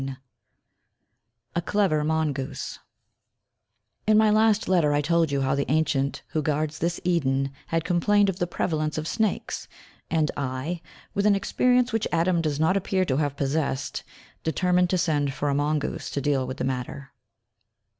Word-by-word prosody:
IV 135 -1 -5 1.4
A - - +2
CLEVER 180 -5 +1
MONGOOSE 150 -3 -2 1.3
In 215 0 +5
my 215 -1 +5
last 215 0 +3
letter 170 -6 +3
I 145 - +2
told 165 +1 +2
you 140 -1 0
how 135 0 +1
the 140 0 -1
ancient 150 -3 0
who 155 - -1
guards 150 +1 -1
this 170 +1 -1
Eden 135 -6 +1 0.2
had 165 -1 0
complained 200 +4 +3
of 190 -2 -2
the 175 - 0
prevalence 155 -3 -1
of 155 0 -3
snakes, 215 +1 -1 0.4
and 155 -3 +1
I, 140 +5 -3 0.3
with 200 +1 +2
an 205 - +5
experience 250 +4 +2
which 225 -1 +1
Adam 170 +1 +2
does 150 -3 -1
not 160 +4 +3
appear 190 -1 +1
to 130 -5 0
have 145 -2 -1
possessed, 140 -1 -1 0.4
determined 180 +2 +2
to 185 - +2
send 145 -5 0
for 145 +1 -1
a - - +1
mongoose 145 +1 -1
to - - -2
deal 140 -2 0
with 130 - -5
the - - -3
matter. 130 +1 -4
155 Hz, 165 wpm, -25 LUFS, 140-180 Hz, 1.4 s, In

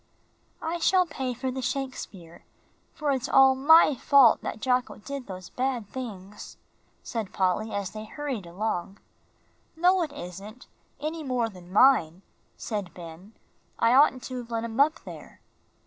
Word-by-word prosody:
"I 330 +2 -2
shall 365 +2 +3
pay 265 -6 -4
for 260 +2 -3
the 260 +1 -5
Shakespeare, 250 -10 -5 0.5
for 300 -3 -1
it's 265 0 -2
all 270 0 +6
my 300 +4 +6
fault 270 -2 +5
that 220 - -5
Jocko 250 +2 0
did 275 +3 -7
those 185 -2 -9
bad 250 -4 -2
things," 210 -6 -8 0.5
said 225 -5 -5
Polly, 190 +4 0
as 200 -3 -3
they 215 0 -8
hurried 255 - -5
along. 195 +1 -3 0.8
"No, 360 +3 +3
it 315 -4 -2
isn't, 205 0 -9 0.3
any 310 +3 -4
more 250 -5 -1
than 180 -3 -14
mine," 190 -6 +4 0.3
said 205 -6 -5
Ben. 175 +4 -11 0.4
"I 230 +1 +3
oughtn't 260 -2 +4
to 255 - -6
have 240 -1 -9
let 230 -1 -2
him 230 +2 -5
up 305 +3 +3
there." - - -11
245 Hz, 150 wpm, -26 LUFS, 200-275 Hz, 0.8 s, all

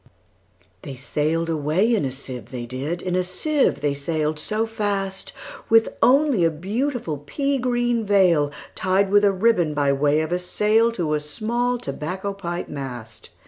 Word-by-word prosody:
They 135 - -7
sail'd 155 +5 -1
away 165 +8 +1
in 210 -10 +1
a 130 - -2
sieve, 130 -4 -8
they 125 -2 -5
did, 140 +8 -4
In 180 -1 -1
a 185 - +2
sieve 275 +12 0
they 145 -1 +1
sail'd 155 +1 -2
so 215 +8 -1
fast, 200 -3 -3 0.4
With 225 0 +5
only 270 - +4
a 165 - +4
beautiful 195 - -3
pea 275 - -1
green 240 -2 0
veilTied 185 +1 +1
with 205 0 +5
a 200 - +5
ribbon, 185 -6 +2
by 140 -1 +2
way 145 +2 +2
of 160 +1 -3
a 180 - +1
sail, 215 +5 +2
To 170 -8 -1
a 150 - +1
small 235 +11 -1
tobacco 185 - -4
pipe 175 -3 -5
mast. 125 -6 -8
180 Hz, 160 wpm, -23 LUFS, 150-220 Hz, 0.4 s, With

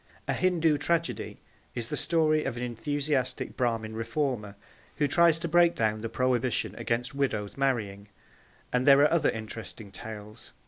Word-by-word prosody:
A - - +1
Hindoo 165 -5 +2
Tragedy 170 +3 -1 0.4
is 115 -2 -4
the - - -2
story 155 -2 +2
of 125 -3 -3
an 120 - -3
enthusiastic 140 +2 -2
Brahmin 115 -3 -1
reformer 115 -3 -2 0.4
who 150 - +1
tries 170 +2 +4
to 170 +1 -4
break 170 +1 +4
down 110 -1 0
the 115 - -4
prohibition 125 0 0
against 125 +4 -2
widows 110 -8 -2
marrying, 110 -7 -1 0.7
and 125 +2 +1
there 140 0 +8
are 150 - +5
other 170 - +3
interesting 110 -1 -6
tales. 105 0 -10
125 Hz, 150 wpm, -28 LUFS, 110-150 Hz, 0.7 s, there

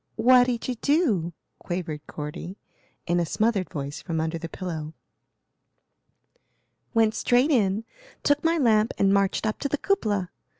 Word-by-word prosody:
"What 245 +2 +5
did 240 -3 -2
you 255 - 0
do? 255 - +2 0.3
quavered 160 -4 -5
Cordy, 150 +5 -7 0.5
in 175 0 +1
a - - +2
smothered 215 0 0
voice 140 -2 -5
from 165 -3 -3
under 160 +1 -2
the 165 - -6
pillow. 160 -5 -6 2.0
"Went 220 -1 +4
straight 250 +7 +2
in, 215 -4 +2 0.4
took 290 0 +2
my 330 +1 +2
lamp 225 -5 +3
and 195 0 +3
marched 200 +1 +1
up 215 - -1
to 280 - -2
the 295 - 0
cupola. 210 - 0
205 Hz, 145 wpm, -25 LUFS, 170-245 Hz, 2.0 s, What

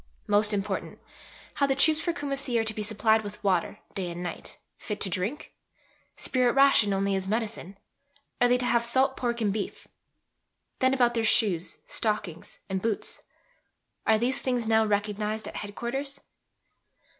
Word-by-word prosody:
Most 210 +1 +3
important: 200 -2 -2 0.6
How 280 - +2
the 270 - +1
troops 310 +2 +4
for 345 - 0
Kumassi 275 -5 -2
are - - +2
to 220 0 -2
be 215 - -4
supplied 220 +1 +2
with 205 +1 -8
water, 185 -4 +1 0.2
day 185 -3 -3
and 175 +1 -6
night, 175 -2 -7 0.2
fit 210 -3 -5
to 190 - 0
drink? 200 - -3 0.6
Spirit 250 -2 +2
ration 275 -7 +5
only 195 0 +1
as 190 -1 -1
medicine? 210 -3 -3 0.6
Are 245 - +6
they 245 0 +4
to 250 - -1
have 235 -1 +2
salt 265 +3 +2
pork 235 -1 -2
and 205 -3 +1
beef? 210 -2 -5 0.9
Then 260 0 +3
about 245 -2 +3
their 230 -1 0
shoes, 195 -6 +2
stockings, 205 -7 -3
and 190 -1 -2
boots? 220 -1 -2 0.9
Are 220 - +5
these 255 +4 0
things 250 -3 -1
now 220 0 +4
recognized 210 +1 -1
at - - -7
Head 205 0 -6
Quarters? 275 +4 -3
220 Hz, 165 wpm, -27 LUFS, 205-250 Hz, 0.9 s, Are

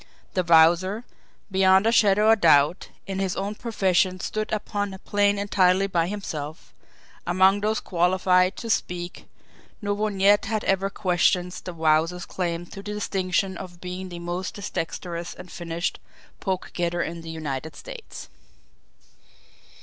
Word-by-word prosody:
The 185 - +1
Wowzer, 170 +6 +4 0.5
beyond 190 +1 +4
a 225 - +4
shadow 210 -1 +5
of 225 - +3
doubt, 155 +1 +4 0.2
in 195 0 -4
his 190 -2 -1
own 200 +2 -2
profession 190 -5 +1
stood 215 +3 -3
upon 205 -2 -2
a - - -9
plane 205 +1 +1
entirely 195 -1 +3
by 170 -4 0
himself 160 -6 -6 0.5
among 190 +3 +4
those 215 +1 +1
qualified 180 +1 +2
to 230 - -6
speak, 175 -5 -3 0.5
no 205 -2 -1
one 205 -1 -2
yet 205 +2 +5
had 215 +1 -2
ever 195 0 +1
questioned 180 -2 +1
the 180 - -5
Wowzer's 160 +2 +1
claim 175 -2 -3
to 185 - -13
the 205 +1 -6
distinction 190 -1 -1
of 175 -2 -9
being 180 +1 -6
the 175 - -7
most 175 +2 -4 0.2
dexterous 170 +1 -4
and 180 -1 -11
finished 170 0 -3 0.4
"poke 190 -2 -3
getter" 175 -1 -1
in 170 +1 -5
the 165 - -9
United 155 -2 -5
States! - - -9
185 Hz, 145 wpm, -25 LUFS, 175-200 Hz, 0.5 s, shadow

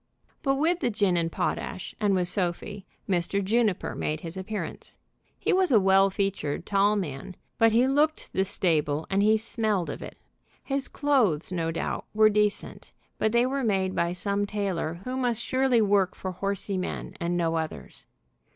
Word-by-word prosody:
But 270 -1 +1
with 330 +5 +1
the 245 - +1
gin 205 -5 +1
and 165 -1 0
potash, 185 - -3
and 205 -2 +2
with 180 -1 +1
Sophie, 185 +2 -2 0.2
Mr. 195 +1 0
Juniper 215 -1 +1
made 155 0 -3
his 165 +1 -6
appearance. 190 +3 -6 0.4
He - - 0
was 370 -3 +3
a 225 - +7
well 195 0 +5
featured, 190 -6 -2
tall 200 +1 +3
man, 175 -2 -4 0.2
but 225 0 +5
he 235 +3 +4
looked 300 +3 +1
the 190 - +2
stable 160 -5 0
and 195 +1 +2
he 215 +1 +4
smelled 215 -4 -1
of - - -7
it. - - -9 0.5
His 275 0 -2
clothes, 230 - +1
no 165 -2 -1
doubt, 165 - -3
were 215 0 +6
decent, 210 0 -1 0.3
but 220 - +2
they 235 +1 +3
were 270 +1 -1
made 190 -4 +1
by 170 0 0
some 200 +3 -1
tailor 185 -5 -2
who 255 0 -4
must 245 -3 0
surely 255 -1 +2
work 200 -2 +2
for 185 - -5
horsey 195 +1 -2
men 180 - -4
and 175 +1 -1
no 165 -1 +1
others. 160 -1 -5
200 Hz, 175 wpm, -27 LUFS, 180-225 Hz, 0.5 s, a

